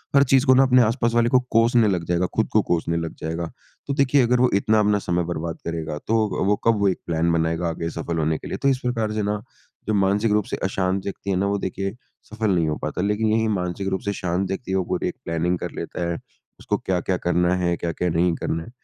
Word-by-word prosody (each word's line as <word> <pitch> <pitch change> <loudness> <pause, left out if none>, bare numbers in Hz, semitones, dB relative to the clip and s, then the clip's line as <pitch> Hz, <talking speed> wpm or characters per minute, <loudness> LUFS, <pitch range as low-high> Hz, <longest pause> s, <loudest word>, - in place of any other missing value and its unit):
हर 140 - +7
चीज़ 135 +1 +3
को 130 - +6
ना 130 +1 +6
अपने 130 -1 +5
आसपास 115 +1 +1
वाले 120 0 +3
को 130 - +5
कोसने 115 0 +4
लग 90 -4 0
जाएगा, 90 +1 +1
ख़ुद - - +2
को - - +5
कोसने 85 0 +1
लग 85 -1 -4
जाएगा। 80 +1 -3 0.4
तो 140 - -1
देखिए 140 -1 +3
अगर 125 +1 +2
वो 125 0 +4
इतना 110 +2 +3
अपना 105 -1 +3
समय 90 -2 -1
बर्बाद 85 -1 -4
करेगा, 80 -2 -3
तो 110 -2 +1
वो 105 - +3
कब 115 -2 +4
वो 100 - +3
एक 95 - -2
प्लान 85 0 +1
बनाएगा 85 +1 0
आगे 85 0 -3
सफल 85 0 -4
होने 80 0 +1
के - - -9
लिए? - - -4
तो 140 - 0
इस 130 -2 +1
प्रकार 115 -4 -1
से 110 -1 -1
ना 105 0 -1 0.5
जो 110 - +1
मानसिक 100 +2 +2
रूप 105 0 +3
से - - -4
अशांत 95 0 0
व्यक्ति 100 0 -5
है 95 - +1
ना, 100 - +1
वो 100 0 0
देखिए 95 +2 -3 0.4
सफल 110 -2 0
नहीं 85 -2 +1
हो 75 - 0
पाता 75 +4 -3
लेकिन 105 +3 0
यही 110 0 +2
मानसिक 95 -1 -2
रूप 95 0 -1
से 100 - 0
शांत 90 0 -1
व्यक्ति 95 +1 -4
है, 95 - +2
वो 95 - +1
पूरी - - -1
एक - - -4
प्लानिंग 85 +2 0
कर - - -4
लेता 85 -1 -4
है 85 - -2 0.4
उसको - - -1
क्या-क्या 95 0 -1
करना 90 0 +1
है, 90 -1 0
क्या-क्या 85 +1 -2
नहीं 85 +1 +2
करना 80 0 -3
है। - - -12
95 Hz, 250 wpm, -23 LUFS, 85-110 Hz, 0.5 s, हर